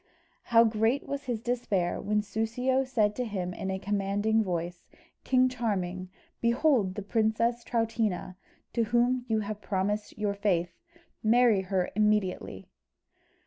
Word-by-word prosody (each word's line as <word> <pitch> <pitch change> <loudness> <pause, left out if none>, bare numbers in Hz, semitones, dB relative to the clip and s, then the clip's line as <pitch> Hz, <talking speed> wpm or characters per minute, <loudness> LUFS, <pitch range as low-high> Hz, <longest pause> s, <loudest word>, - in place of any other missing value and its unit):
How 230 -1 +6
great 225 +4 +1
was 280 0 -4
his 240 -3 -2
despair, 210 -8 -1
when 210 0 0
Soussio 230 +6 0
said 215 -5 +1
to 250 - 0
him 190 -6 -3
in 190 - -5
a 190 - -1
commanding 205 +2 0
voice, 175 -2 -4 0.4
"King 255 0 +4
Charming, 190 -7 -2 0.3
behold 235 -5 +2
the 205 - -4
princess 230 +3 +1
Troutina, 225 -6 -1 0.4
to 230 -2 +1
whom 240 +3 +1
you 220 -1 +1
have 210 0 -5
promised 205 +2 -2
your 210 -1 0
faith: 185 -4 0 0.5
marry 225 -2 +4
her 185 -1 -1
immediately!" 210 - 0
215 Hz, 135 wpm, -28 LUFS, 195-235 Hz, 0.5 s, How